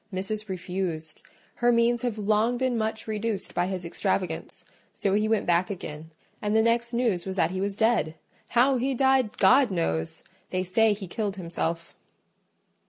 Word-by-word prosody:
Missis 210 +3 -3
refused: 180 -3 -4 0.4
her 240 0 +3
means 235 0 +3
have 240 -3 -2
long 215 +3 +2
been 255 -1 0
much 220 -1 -2
reduced 215 -2 -2
by 175 0 +1
his 185 -2 -4
extravagance; 180 -1 -2 0.3
so 195 - -1
he 210 +1 +2
went 220 -2 +1
back 175 +1 +2
again, 160 -5 -7 0.3
and 210 0 0
the 220 - +5
next 235 +1 +1
news 230 -7 0
was 190 - -3
that 170 -3 +2
he 185 0 -3
was 200 0 -1
dead. 220 -8 +2 0.4
How 260 +2 +5
he 265 +2 0
died, 265 -3 +2
God 260 -1 +5
knows!—they 165 - -3
say 215 +4 +3
he 205 -1 -6
killed 200 +2 -3
himself." 170 -2 -4
205 Hz, 165 wpm, -26 LUFS, 180-230 Hz, 0.4 s, the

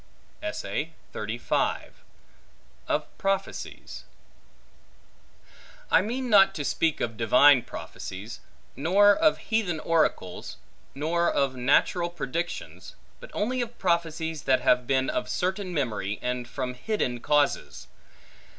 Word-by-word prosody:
Of - - 0
Prophecies 195 -1 -3 1.9
I - - +6
MEAN 250 +4 -3
not 195 -3 +6
to 145 - -3
speak 160 +1 0
of 115 -1 -2
divine 125 +4 +6
prophecies; 100 0 -8 0.4
nor 200 +9 +5
of 315 0 +3
heathen 200 -8 -1
oracles; 155 - -1 0.4
nor 170 +4 +1
of 135 -2 0
natural 145 +7 +2
predictions; 170 +1 -5 0.2
but - - -11
only 250 +4 0
of 240 0 -5
prophecies 165 -3 -1
that 130 -1 +3
have 125 -1 +3
been 130 -1 +2
of 210 - -2
certain 185 +1 -2
memory, 110 - -2
and 125 -1 -2
from 125 0 -4
hidden 125 - -2
causes. 145 +3 0
160 Hz, 105 wpm, -27 LUFS, 130-195 Hz, 1.9 s, I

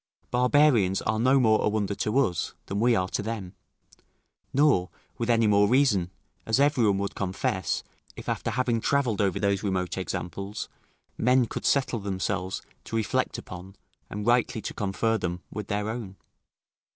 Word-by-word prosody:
Barbarians 125 -6 +4
are 110 0 0
no 130 +3 +4
more 110 -3 +3
a - - +3
wonder 105 -1 -1
to 105 +4 -1
us, 115 - 0
than 100 - -3
we 120 +1 +4
are 90 -2 +1
to - - -2
them; 105 -4 -5 1.0
nor 135 -11 +3 0.3
with 115 0 -2
any 115 -1 +4
more 105 -1 +4
reason, 120 -9 +3 0.3
as 115 +3 +1
every 140 -5 +3
one 100 -1 +2
would 100 0 -2
confess, 95 -1 -2 0.3
if - - -10
after - - -1
having 120 -2 0
travelled 125 -7 +1
over 95 -3 +1
those 100 -1 +1
remote 95 -2 -1
examples, 95 +3 -5 0.5
men 125 +1 +4
could - - -3
settle 135 -4 +1
themselves 95 -1 -3 0.2
to - - -5
reflect 110 -2 0
upon, 95 +2 -9 0.3
and 105 0 -5
rightly 120 -1 +2
to - - -5
confer 110 +3 0
them, 90 -1 -3
with 105 -1 -5
their 105 +1 -1
own. 110 -4 -5
105 Hz, 165 wpm, -27 LUFS, 95-120 Hz, 1.0 s, Barbarians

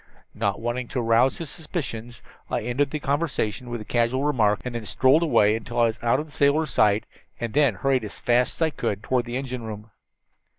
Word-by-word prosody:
Not 100 -2 -1
wanting 120 +2 -3
to 130 - -3
arouse 115 +2 +3
his 165 -4 -6
suspicions, 120 -8 -5 0.3
I - - -1
ended 125 +5 0
the 150 - -3
conversation 135 -5 -1
with 120 -2 -4
a - - -8
casual 120 +4 +1
remark, 110 -8 +2
and 125 - -4
then 120 -1 -4
strolled 135 +5 +4
away 110 -10 +4
until 115 +2 -4
I - - +5
was 115 0 -1
out 115 0 +2
of 150 - -3
the 155 - -17
sailor's 145 +2 +2
sight, 105 +1 +3 0.3
and 120 -2 -4
then 140 -7 +3
hurried 130 +4 +1
as 105 - -7
fast 125 +1 +2
as - - -11
I 160 - +3
could 105 -6 -3
toward 125 -2 0
the 120 +1 -3
engine 130 -2 -4
room. 110 -1 -8
120 Hz, 215 wpm, -24 LUFS, 115-140 Hz, 0.3 s, I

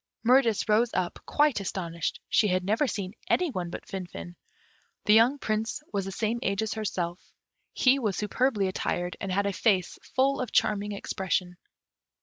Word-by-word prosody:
Mirtis 235 -3 +4
rose 220 +3 +3
up, 175 -1 -1
quite 295 -6 +3
astonished; 170 -4 -3
she 215 - +3
had 185 -1 +1
never 220 +9 +1
seen 195 -5 -4 0.2
any 360 -4 +2
one 180 -6 -3
but - - -7
Finfin. 180 -2 -7 0.7
The 210 - +5
young 235 +6 +5
Prince 225 +3 -2
was 200 -2 -1
the 195 - -4
same 225 +3 -1
age 200 +2 0
as 220 - -2
herself. 180 -5 -3 0.5
He 265 +1 +4
was 210 -7 -1
superbly 210 -1 +1
attired, 180 -1 -2
and 195 - -3
had 200 +2 +1
a 200 - 0
face 190 -3 +1 0.2
full 270 +1 +3
of 255 - -4
charming 210 -1 +1
expression. 185 -2 -2
205 Hz, 165 wpm, -28 LUFS, 185-230 Hz, 0.7 s, The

